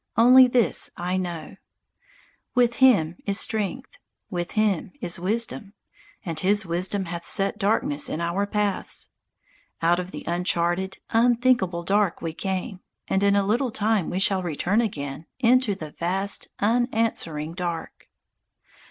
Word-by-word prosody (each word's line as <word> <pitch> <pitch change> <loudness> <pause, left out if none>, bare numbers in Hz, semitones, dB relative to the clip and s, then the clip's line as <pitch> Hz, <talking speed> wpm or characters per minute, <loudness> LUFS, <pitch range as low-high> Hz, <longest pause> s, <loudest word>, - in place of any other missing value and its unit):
Only 255 +2 +8
this 240 -6 +2
I 180 +1 -2
know: 175 -4 -5 1.0
With 240 -1 +3
Him 195 -11 +4
is 200 +1 +1
strength, 220 +4 -3 0.3
with 175 -1 -3
Him 210 -5 0
is 175 -8 -3
wisdom, 215 +2 -2 0.5
And 165 -3 -3
His 205 +4 +1
wisdom 185 +3 -1
hath 170 0 -6
set 195 +4 +1
darkness 195 -8 +1
in 155 - -3
our 170 +4 -1
paths. 205 -1 -2 0.7
_Out 170 +2 +2
of 180 0 -5
the - - -8
uncharted, 175 +2 0
unthinkable 235 -6 +2
dark 200 0 +1
we 165 -1 -4
came, 190 +1 -4 0.3
And 190 - +1
in 200 0 +3
a 200 -1 +2
little 240 +6 +1
time 215 -4 0
we 180 - -3
shall 195 0 +2
return 180 +6 0
again 145 -8 -4
Into 245 -3 +3
the 155 -5 -8
vast, 190 +5 -1
unanswering 220 - 0
dark. 170 -2 -5
195 Hz, 135 wpm, -24 LUFS, 175-220 Hz, 1.0 s, Only